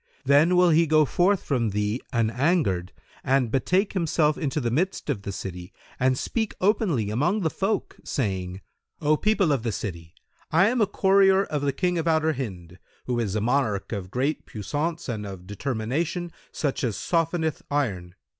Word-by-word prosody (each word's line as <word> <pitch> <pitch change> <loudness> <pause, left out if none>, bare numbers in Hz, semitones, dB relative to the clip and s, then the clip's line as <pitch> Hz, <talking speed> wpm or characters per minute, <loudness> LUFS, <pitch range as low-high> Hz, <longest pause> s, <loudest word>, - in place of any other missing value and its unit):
Then 145 +6 +5
will 180 -1 +5
he 165 +1 +4
go 155 0 +4
forth 185 +7 +2
from 120 -6 0
thee 105 +4 -1
an 115 -2 +1
angered 120 - +1 0.3
and 135 -4 +2
betake 185 - +1
himself 160 -4 +2
into 150 -1 -2
the 120 -4 -1
midst 165 +2 -1
of 110 -8 -3
the 100 - -5
city 90 -2 -7 0.3
and 130 0 +2
speak 220 - -2
openly 180 - +1
among 175 - +1
the 160 -4 0
folk, 200 +3 -2
saying, 95 -6 -3 0.4
'O 150 +1 +3
people 200 -2 +2
of 135 -5 +1
the 115 0 -2
city, 85 -5 -6 0.3
I 180 +6 +4
am 245 0 0
a 210 - +4
courier 195 0 +4
of 150 -6 -3
the 140 -1 +1
King 180 +2 0
of 165 - -2
Outer 160 -1 +2
Hind, 90 - -7 0.3
who 125 -1 -1
is 105 -4 -1
a 110 - 0
monarch 110 -5 0
of 100 -4 -4
great 135 +8 -2
puissance 150 - -3
and 110 -4 -3
of 95 -3 -8
determination 135 - -2 0.2
such 145 -1 -2
as 115 -6 -1
softeneth 165 -2 0
iron. 95 -12 -2
140 Hz, 175 wpm, -25 LUFS, 105-170 Hz, 0.4 s, Then